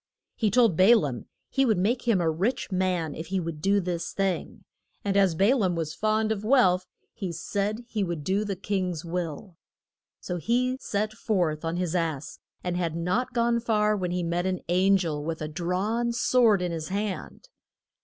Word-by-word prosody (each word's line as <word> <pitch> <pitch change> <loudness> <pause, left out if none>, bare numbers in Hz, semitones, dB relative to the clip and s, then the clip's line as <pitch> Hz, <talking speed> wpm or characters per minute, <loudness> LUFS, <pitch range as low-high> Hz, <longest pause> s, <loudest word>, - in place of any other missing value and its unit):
He 220 - +1
told 225 -3 +4
Ba 190 +8 +7
laam 135 - -3 0.2
he 270 - +1
would 220 -6 +3
make 235 +7 0
him 220 -5 +4
a 165 -1 +2
rich 200 +9 -1
man 180 -4 0
if 160 - -7
he 190 +2 -1
would 165 -3 -5
do 200 +3 +3
this 175 -2 -3
thing, 195 -2 -2 0.4
and 200 -1 0
as 195 -4 +4
Ba 200 +10 +4
laam 190 -8 +1
was 160 -2 -3
fond 215 0 +1
of 210 -2 -2
wealth 210 -7 +3 0.3
he 195 -6 -4
said 205 +7 -3
he 215 -4 -1
would 170 -5 -3
do 195 +6 +1
the 200 -2 -3
king's 185 -4 -2
will. 170 +1 -4 0.6
So 180 - -4
he 250 +7 +1
set 215 +1 -2
forth 180 -9 -1
on 165 +1 -2
his 180 -2 -1
ass, 160 -5 -2 0.2
and 180 -1 -2
had 170 -3 -1
not 185 +10 -1
gone 235 0 +2
far 215 -2 +2
when 185 -3 -2
he 180 0 -1
met 170 +2 -1
an 185 -1 -2
an 190 +3 +4
gel 155 -5 -2
with 160 +1 -3
a 155 - -3
drawn 190 +9 -1
sword 230 -5 +3
in 175 - -1
his 160 -2 -4
hand. 205 - -4
185 Hz, 195 wpm, -27 LUFS, 170-215 Hz, 0.6 s, Ba